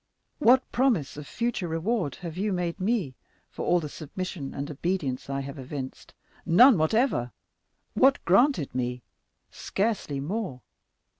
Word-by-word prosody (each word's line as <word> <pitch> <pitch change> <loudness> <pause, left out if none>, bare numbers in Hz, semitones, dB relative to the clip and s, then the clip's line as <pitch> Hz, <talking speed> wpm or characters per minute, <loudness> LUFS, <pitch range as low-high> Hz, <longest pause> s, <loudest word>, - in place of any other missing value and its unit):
What 260 -1 +6
promise 230 - +1
of 150 0 -8
future 230 -6 -2
reward 165 - -1
have 165 -2 -5
you 205 +3 -1
made 180 -1 -2
me 190 - 0 0.4
for - - -5
all 175 - +4
the 155 - -5
submission 155 0 -6
and 140 +2 -5
obedience 145 -4 -2
I 140 0 -2
have 140 +1 -7
evinced?—none 160 - +2
whatever. 160 - +1 0.6
What 270 0 +5
granted 195 - +3
me?—scarcely 135 - -4
more. 170 - -4
170 Hz, 125 wpm, -27 LUFS, 140-220 Hz, 0.6 s, What